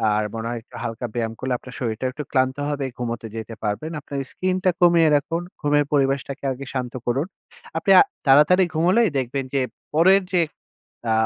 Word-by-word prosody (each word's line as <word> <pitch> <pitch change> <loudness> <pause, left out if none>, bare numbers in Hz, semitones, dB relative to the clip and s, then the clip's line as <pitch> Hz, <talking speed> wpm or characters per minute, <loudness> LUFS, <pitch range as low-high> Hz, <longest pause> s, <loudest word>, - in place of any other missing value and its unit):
আর 105 - +1
মনে 115 0 -4
হয় 120 - -3
একটু - - -17
হালকা 115 +1 -4
ব্যায়াম 115 -2 -2
করলে 130 0 -1
আপনার 125 +1 -12
শরীরটাও 120 +1 -2
একটু 150 +3 -5
ক্লান্ত 130 0 +1
হবে, 145 -2 -2
ঘুমোতে 115 -2 -4
যেতে 115 0 -6
পারবেন। 110 +10 -2
আপনার 140 0 -7
স্কিনটা 185 0 0
কমিয়ে 170 -2 +6
রাখুন। 165 +4 0 0.2
ঘুমের 145 -1 +3
পরিবেশটাকে 140 0 0
আগে 135 +1 -6
শান্ত 125 -2 -3
করুন। 135 +5 +1 0.5
আপনি 195 - +1
আ - - +10 0.3
তাড়াতাড়ি 150 +7 +6
ঘুমোলেই 185 +8 +3
দেখবেন 135 +1 -1
যে, 135 - +2 0.3
পরের 190 +5 +5
যে 180 - +4 0.7
আ - - +3
140 Hz, 175 wpm, -23 LUFS, 120-160 Hz, 0.7 s, আ